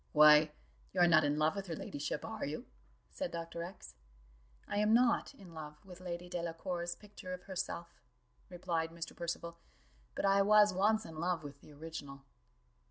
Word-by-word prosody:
"Why, 150 0 +8 0.4
you 185 - -1
are - - +9
not 165 -2 +6
in 145 +1 +1
love 155 +3 +2
with 200 -1 -4
her 165 - -3
ladyship, 145 0 -4
are 225 0 -5
you?" 150 +2 -4 0.5
said - - -3
Dr. 170 0 -5
X. 170 - -8 0.7
"I - - -2
am 210 +2 +4
not 250 +3 +3
in 190 -8 -13
love 150 +2 -9
with 180 -1 -11
Lady 175 -1 -5
Delacour's 175 0 -3
picture 205 -3 -9
of 180 - -15
herself," 175 -2 -5 0.5
replied 170 -2 -2
Mr. 165 0 -7
Percival, 170 0 -4 0.6
"but - - -1
I 195 0 +5
was 210 0 +6
once 215 +4 +2
in 160 -1 -8
love 175 -1 0
with 140 -1 -9
the - - -15
original." 145 -2 -8
170 Hz, 170 wpm, -34 LUFS, 160-190 Hz, 0.7 s, are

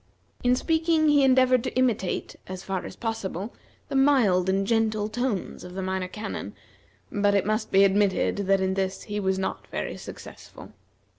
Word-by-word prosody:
In 250 0 +4
speaking 320 +2 +2
he 290 -1 +5
endeavored 255 -2 +4
to - - -4
imitate, 235 -8 0
as 185 0 -7
far 190 -2 -3
as - - -10
possible, 215 -2 -4 0.3
the - - -5
mild 240 -10 +4
and 195 +1 +1
gentle 220 -1 +1
tones 235 -2 -3
of 180 0 -10
the 190 - -3
Minor 190 0 -2
Canon, 215 +4 -6 0.6
but 205 -1 +2
it 200 - +2
must 215 +2 -1
be 195 +1 +6
admitted 200 0 +2
that 195 0 +3
in 190 0 +1
this 190 0 -2
he 210 -1 -4
was 190 -1 0
not 190 - -4
very - - -4
successful. - - -11
205 Hz, 170 wpm, -26 LUFS, 190-245 Hz, 0.6 s, be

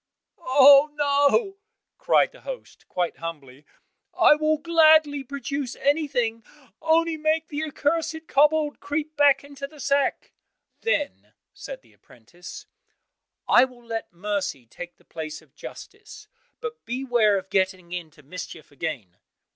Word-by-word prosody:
"Oh, 280 0 +7
no," 290 +8 +2 0.4
cried - - +3
the - - -17
host, - - -9
quite 175 -2 -2
humbly, 150 -4 -8 0.5
"I - - +7
will 310 +1 +1
gladly 310 -3 +4
produce 280 0 -4
everything, 255 -6 0 0.4
only 325 0 +2
make 315 +1 0
the 300 +1 -3
accursed 320 +2 -2
kobold 300 +1 +2
creep 300 +2 -4
back 285 -1 +4
into 280 -1 -8
the 300 +1 -17
sack." 280 0 0 0.5
Then 295 -11 -2 0.2
said - - -9
the - - -24
apprentice, 150 +10 -13 0.8
"I 245 - +6
will 245 -2 -16
let 225 -1 -5
mercy 190 - -3
take 175 +9 -10
the - - -27
place 155 -1 -7
of 155 -4 -24
justice, - - -11 0.3
but 465 0 -6
beware 240 -5 +1
of 190 0 -7
getting 185 -2 0
into 160 -4 -7
mischief 160 0 -9
again!" 135 - -6
275 Hz, 130 wpm, -24 LUFS, 185-310 Hz, 0.8 s, Oh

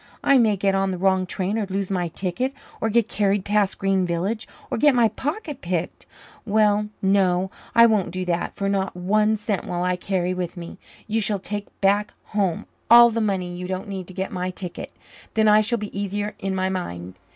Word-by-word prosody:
I 275 -1 +5
may 215 -4 +3
get 195 +1 +1
on 195 0 +1
the 185 - -2
wrong 190 0 +2
train 200 +4 -2
or 205 - -2
lose 195 0 -2
my 180 -2 0
ticket 190 - -3 0.3
or 225 - +1
get 230 0 +2
carried 200 -2 0
past 205 -2 +1
Green 195 -1 +1
Village 180 +6 -2 0.2
or - - -1
get 290 -1 +5
my 235 -2 +4
pocket 295 - -4
picked. 175 -1 -3 0.4
Well, 210 -1 +2 0.2
no, 190 -1 +2 0.2
I 230 0 +8
won't 215 -5 +2
do 185 +1 -4
that, 175 -1 -2
for 200 - -2
not 195 -2 -1
one 210 +4 +2
cent 210 -2 -2
will 175 0 -2
I 180 0 +1
carry 180 0 -1
with 180 -1 -4
me. 170 -1 -8 0.3
You 220 +1 0
shall 205 0 +1
take 205 +2 -5
back 205 +1 +2
home 195 -5 -1 0.2
all 235 0 +9
the 230 0 -1
money 185 -4 -1
you 180 0 -5
don't 185 +2 -4
need 190 -3 -5
to 185 - -11
get 190 0 -3
my 180 0 -2
ticket. 180 -1 -7 0.4
Then 220 -1 +4
I 210 0 +6
shall 235 +3 0
be 210 -2 -7
easier 205 +1 -2
in 195 -1 -2
my 185 0 0
mind. 90 - -4
195 Hz, 205 wpm, -23 LUFS, 185-215 Hz, 0.4 s, all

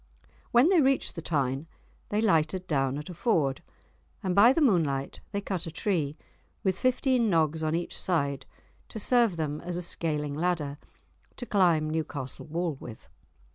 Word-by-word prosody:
When 245 +7 +5
they 365 -4 +5
reached 270 -1 +2
the 165 - -6
Tyne 140 -2 -1 0.4
they 210 +1 0
lighted 185 -3 +2
down 135 -4 0
at 150 - -6
a - - -7
ford, 155 - +1 0.6
and 185 -2 0
by 210 +6 +7
the 270 - +1
moonlight 160 - +1
they 200 0 -2
cut 190 -3 -3
a - - -5
tree, 160 -5 -1 0.5
with 190 -2 0
fifteen 255 -2 +2
nogs 160 -3 +1
on 155 0 0
each 170 +1 -3
side, 140 -7 -1 0.4
to - - -7
serve 230 -3 +3
them 150 -2 -2
as 175 0 -3
a 180 - -3
scaling 150 -4 -1
ladder, 150 -3 -1 0.6
to 245 - -6
climb 175 -8 +3
Newcastle 155 -4 -4
wall 165 -1 -2
with. 115 -3 -11
165 Hz, 165 wpm, -28 LUFS, 150-200 Hz, 0.6 s, by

